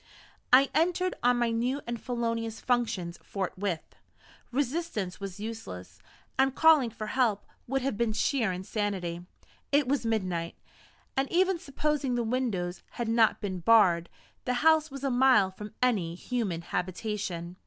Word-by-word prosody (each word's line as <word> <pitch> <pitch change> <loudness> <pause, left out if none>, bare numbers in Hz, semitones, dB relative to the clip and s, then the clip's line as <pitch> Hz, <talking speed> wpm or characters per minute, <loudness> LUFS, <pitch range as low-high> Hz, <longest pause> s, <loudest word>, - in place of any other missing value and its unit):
I 265 +2 +6
entered 360 +4 +1
on 245 0 +3
my 240 -1 +1
new 245 +4 0
and 235 -1 -4
felonious 230 -2 -2
functions 220 -8 -1
forthwith. 190 -3 -4 0.6
Resistance 260 - -2
was 195 -1 -6
useless, 95 - -7 0.4
and 270 0 +3
calling 315 -6 +6
for 215 -1 -6
help 220 -3 +1 0.2
would 270 +1 -1
have 265 -6 -1
been 235 -1 +1
sheer 225 0 +1
insanity. 185 -2 -3 0.5
It 285 -2 +3
was 280 0 +1
midnight; 185 -7 -1 0.6
and, 270 0 0
even 370 0 +3
supposing 290 -3 -1
the 240 - 0
windows 220 -7 -2
had 235 -2 -3
not 225 -1 +3
been 190 -3 -3
barred, 175 -4 +4 0.4
the 250 - 0
house 315 -1 +5
was 275 -1 -8
a 275 - +1
mile 245 -6 +5
from 210 +3 -10
any 190 -10 +1
human 195 -5 -3
habitation. 180 -1 -3
230 Hz, 145 wpm, -29 LUFS, 190-265 Hz, 0.6 s, I